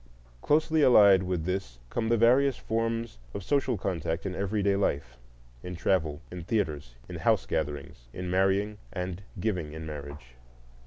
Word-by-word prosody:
Closely 155 - +2
allied 100 -8 +7
with 90 -3 -2
this 90 -9 -3
come 115 -1 -1
the 115 - +3
various 125 +4 +4
forms 115 - -2 0.2
of 100 - -4
social 135 -1 +1
contact 85 -3 -2
in 95 - -2
everyday 100 +1 0
life, 70 -10 -1 0.5
in 90 +4 -6
travel, 80 -4 0
in 90 -1 -6
theatres, 75 - -2
in - - -6
house - - +2
gatherings, 70 -4 -4
in 90 +6 -6
marrying 95 +3 +1
and 90 0 -4 0.2
giving 90 -7 -2
in 80 0 -7
marriage. 70 -4 -8
95 Hz, 150 wpm, -28 LUFS, 80-110 Hz, 0.5 s, allied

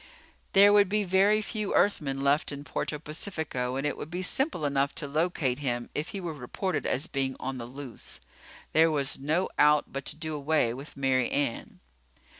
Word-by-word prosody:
There 200 +1 +8
would 205 -2 +5
be 210 +1 +1
very 200 +3 +3
few 210 -1 -2
Earthmen 135 -9 +1
left 140 +2 +2
in 140 0 -6
Puerto 145 +2 -3
Pacifico, 150 -5 -3
and 135 +2 -2
it 145 - 0
would 150 - -7
be 180 +2 -3
simple 265 - +1
enough 140 0 +1
to 150 - -2
locate 150 -4 0
him 120 -4 -2
if 150 +3 -2
he 200 - -5
were 175 -3 -4
reported 155 +6 -3
as 135 +4 +1
being 135 -5 -2
on 130 0 -4
the 115 - -6
loose. 130 -1 -6 0.5
There 160 +1 +6
was 145 -3 0
no 155 +7 +1
out 150 0 +4
but 135 0 -4
to - - -3
do 155 0 -4
away 150 -5 +1
with 140 +3 -10
Mary 130 -2 +2
Ann. 140 -5 -2
150 Hz, 190 wpm, -28 LUFS, 135-175 Hz, 0.5 s, There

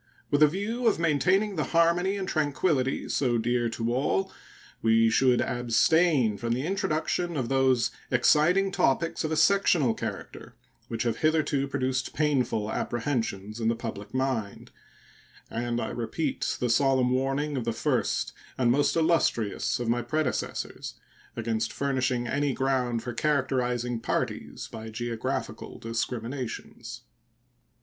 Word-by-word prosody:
With 145 +1 +2
a 150 - +9
view 215 +9 -2
of 220 - +3
maintaining 180 +6 +2
the 155 - +1
harmony 175 +4 +3
and 190 -1 -3
tranquillity 145 -3 0
so 125 -4 +1
dear 120 +1 0
to 115 +1 -2
all, 190 +9 0 0.5
we 115 0 +4
should 125 +1 +3
abstain 125 - +2
from 115 0 -1
the 130 +4 -2
introduction 175 -2 -1
of 125 -4 -2
those 130 -3 +2 0.2
exciting 160 +9 +3
topics 165 -1 +1
of 155 - -2
a - - +1
sectional 170 - +3
character - - -7 0.3
which 115 -1 -3
have 115 -2 -1
hitherto 155 -3 +1
produced 130 -1 -2
painful 125 -8 0
apprehensions 115 -4 -2
in 110 - 0
the 115 - +2
public 110 -3 -7
mind; 130 -6 -2 0.8
and 120 0 -2
I - - -2
repeat 135 +5 -2
the 125 - 0
solemn 130 0 +3
warning 135 +3 0
of 130 - -2
the 115 - -1
first 110 - -1 0.2
and 120 -2 +3
most 145 +3 +2
illustrious 160 -13 +1
of 120 - -3
my 120 +1 +1
predecessors 155 0 -3 0.4
against 115 -1 -1
furnishing 130 -3 0
"any 140 +2 0
ground 125 -3 0
for 120 - -4
characterizing 125 -4 0
parties 115 - -3
by 110 0 -8
geographical 115 0 -4
discriminations." 115 +2 -5
130 Hz, 135 wpm, -27 LUFS, 120-155 Hz, 0.8 s, a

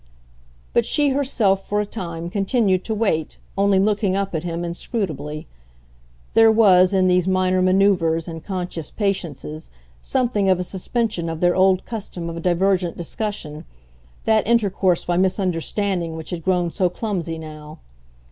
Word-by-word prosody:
But - - +3
she 290 -1 +1
herself, 250 -8 +1
for 205 - +1
a 210 - 0
time, 170 -5 -6
continued 195 -2 +1
to 220 - -2
wait, 195 -8 -1 0.2
only 200 0 +3
looking 200 -1 +1
up 195 -1 -2
at 160 -1 -2
him 170 0 -3
inscrutably. 170 - -4 0.9
There 225 0 +6
was 190 -5 +5
in 190 -2 +3
these 180 0 +2
minor 185 0 +2
manoeuvres 185 -4 +2
and 165 -2 -7
conscious 180 -5 -4
patiences 165 - -3 0.3
something 235 -7 0
of 185 -1 +3
a - - -1
suspension 190 -1 -2
of 165 -1 -4
their 175 0 +3
old 190 0 +3
custom 185 -7 -5
of 165 0 -6
divergent 180 0 +1
discussion, 170 -4 -4 0.6
that 220 -2 +2
intercourse 200 -6 +2
by 175 0 0
misunderstanding 185 -1 0
which 160 +2 -7
had 170 -2 -5
grown 180 -1 +1
so 185 -1 +1
clumsy 175 -5 -3
now. 155 -1 -10
185 Hz, 145 wpm, -21 LUFS, 170-200 Hz, 0.9 s, There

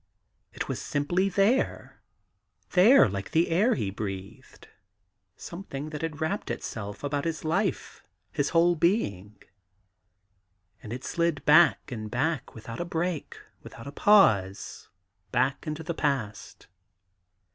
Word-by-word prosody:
It - - -5
was - - -4
simply 175 +7 0
there 200 +7 0 0.3
— - - -46
there 195 - +7
like 100 -1 -5
the 165 +2 +2
air 200 +10 +3
he 105 -6 -2
breathed 95 -2 -8 0.4
— - - -48 0.3
some 175 +3 -8
thing 145 +3 -6
that 150 - -5
had 160 -2 -4
wrapped 165 +6 -2
itself 105 0 -6
about 145 0 -1
his 165 -1 -3
life, 180 +1 -2 0.3
his 145 -1 -1
whole 170 +1 +4
being. 110 - 0 1.5
And 105 - -9
it 125 +2 -6
slid 170 -1 -1
back 155 0 +5
and 110 -3 -5
back, 140 +5 -2
without 115 +1 -8
a - - -1
break, 170 -1 -3 0.2
without 115 - -11
a 140 - -7
pause, 110 - +3 0.4
back 130 +6 0
into 155 +1 -4
the 170 - -3
past. 130 -10 -3
150 Hz, 135 wpm, -27 LUFS, 115-170 Hz, 1.5 s, there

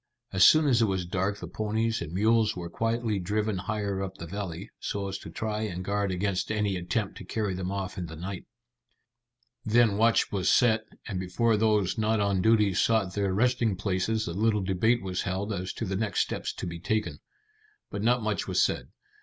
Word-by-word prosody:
As 95 -1 +4
soon 155 - +7
as 125 -5 +3
it - - +5
was 95 -2 -1
dark 95 +3 -1
the - - -7
ponies 110 +1 -1
and 80 -2 -5
mules 110 +3 +2
were 85 -1 -6
quietly 115 -1 -1
driven 105 +2 -1
higher 100 0 -2
up 95 0 -5
the 85 - -7
valley, 95 +1 -6
so 100 -1 -3
as 95 0 -4
to - - -9
try 110 +5 -3
and 95 -4 -4
guard 100 0 0
against 95 +2 -1
any 105 -2 0
attempt 95 +4 -2
to - - -8
carry 105 +1 -2
them 90 0 -3
off 100 0 -4
in 90 - -4
the 80 - -8
night. 90 +3 -6 1.2
Then 110 -2 +3
watch 115 +2 +3
was 95 -3 +1
set, 110 -3 +4 0.2
and 100 -4 -3
before 110 +5 +1
those 105 -2 +2
not 110 0 +2
on 100 -2 +1
duty 105 -2 +4
sought 100 0 +2
their 100 -1 0
resting 115 +1 +2
places 100 +3 -1
a 85 - -3
little 105 +1 +1
debate 105 +5 +2
was 90 -1 -2
held 100 +2 -2
as 95 -1 -3
to 115 - -4
the 95 -1 -2
next 105 +1 0
steps - - -2
to - - -6
be 85 -1 -5
taken. 90 -5 -1 0.7
But 100 - -4
not 120 +2 +2
much 105 -4 -1
was - - 0
said. - - +1
100 Hz, 205 wpm, -28 LUFS, 95-110 Hz, 1.2 s, soon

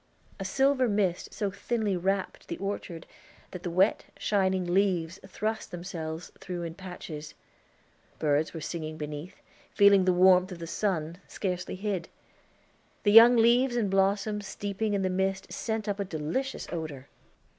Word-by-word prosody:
A 195 - -4
silver 265 +5 +2
mist 195 -4 0
so 205 -2 -2
thinly 205 0 -1
wrapped 190 +2 -2
the 170 - -4
orchard 195 -4 -5 0.5
that 180 - -7
the 175 - -3
wet, 185 +5 +2
shining 190 -3 +1
leaves 185 -3 +1
thrust 215 +3 -3
themselves 170 -2 -6
through 180 -2 -5
in 165 -1 -5
patches. 170 -5 -8 0.8
Birds 150 0 +1
were 165 - -7
singing 155 0 -5
beneath, 150 +4 -6 0.4
feeling 200 -2 +6
the 185 - +4
warmth 185 +1 +5
of 180 - -6
the 170 - -6
sun, 170 -2 -2
scarcely 180 -3 -3
hid. 190 -3 -3 0.9
The 205 - +4
young 230 +3 +9
leaves 240 +2 +4
and 215 -5 0
blossoms 200 +1 +1
steeping 205 +2 -2
in 195 - 0
the 185 - +1
mist 190 +1 -1
sent 220 -2 -3
up 205 0 -2
a - - +1
delicious 185 - -3
odor. 155 -5 -5
190 Hz, 150 wpm, -28 LUFS, 170-205 Hz, 0.9 s, young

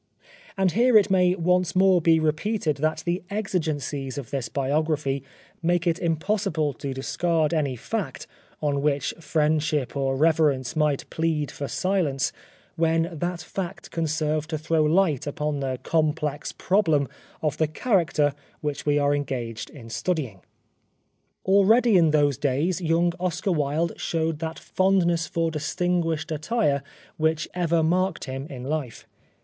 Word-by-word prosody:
And 190 -2 +2
here 240 +3 +5
it 205 -2 +3
may 180 -1 +4
once 180 0 +1
more 185 -1 +5
be 165 0 +4
repeated 155 - 0
that 155 +2 -1
the 175 +1 0
exigencies 155 - -2
of 135 -5 -6
this 135 -4 -2
biography 140 -1 0 0.4
make 175 +1 +1
it 170 0 +1
impossible 165 -2 0
to 135 +3 -5
discard 160 +4 0
any 145 -5 0
fact, 115 - -4 0.4
on 140 -2 +1
which 145 -2 0
friendship 155 -4 0
or 135 -1 0
reverence 150 -3 +2
might 150 -3 +1
plead 160 -3 -1
for 140 - -5
silence, 170 -9 0 0.4
when 165 0 +2
that 175 +1 -3
fact 180 +1 -6
can 165 -1 -1
serve 155 0 -1
to 160 -1 -2
throw 160 +1 +1
light 155 -3 +2
upon 150 0 -2
the 130 -2 -2
complex 155 -2 0
problem 160 -8 +2 0.4
of 150 -4 0
the 155 - +2
character 160 - +1 0.3
which 150 -1 -4
we 145 0 +3
are 145 0 +3
engaged 125 -6 -3
in 120 -6 -12
stud5dng. 125 - -2 1.0
Already 205 +4 +5
in 165 -3 +5
those 145 -3 +2
days 150 +7 0
young 170 +1 +2
Oscar 185 +2 -1
Wilde 155 +1 0
showed 160 -2 -1
that 160 0 -4
fondness 175 -3 +1
for 165 -1 -1
distinguished 165 +1 -1
attire 155 - 0 0.4
which 160 -1 +1
ever 170 -2 +1
marked 180 +2 +1
him 135 +1 -5
in 125 -3 -7
life. 140 -4 -4
160 Hz, 145 wpm, -25 LUFS, 145-175 Hz, 1.0 s, here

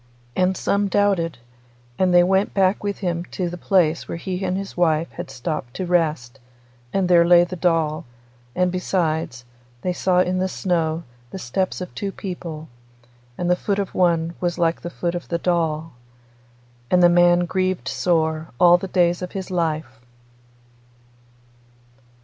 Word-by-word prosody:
And 185 0 +1
some 200 0 +1
doubted, 190 -7 +1 0.6
and 185 -1 +3
they 175 0 +6
went 190 +2 +1
back 195 +1 +2
with 200 -1 -2
him 170 -1 -1
to 180 -1 -4
the - - -5
place 175 -3 +1
where - - -4
he 185 +2 -4
and 185 0 -1
his 195 0 -6
wife 165 -2 +1
had - - -7
stopped 135 -1 -5
to 185 - -3
rest, 155 -8 0 0.5
and 190 +2 +1
there 175 -1 +6
lay 175 0 +6
the 175 +1 -5
doll, 165 -3 0 0.5
and 180 0 +2
besides, 160 -9 -1 0.4
they 180 - 0
saw 180 0 +1
in 180 0 +1
the 185 - +1
snow 170 -3 -1 0.3
the - - -7
steps 185 +5 -2
of 180 - -6
two 200 -1 -4
people, 170 -5 -7 0.7
and 175 - -2
the 180 - +4
foot 200 +2 -2
of 200 -2 -3
one 170 -2 +1
was 175 -1 -1
like 170 -1 +1
the 175 - -5
foot 175 0 -3
of 175 -1 -5
the 170 - -1
doll. 165 -2 -1 1.0
And 180 -1 +4
the - - +9
man 175 0 +5
grieved 185 +1 -1
sore 160 -2 0
all 175 0 +7
the 195 - -5
days 175 -1 +2
of 180 - -6
his 190 -1 -5
life. 155 -8 -2
175 Hz, 165 wpm, -22 LUFS, 165-185 Hz, 1.0 s, the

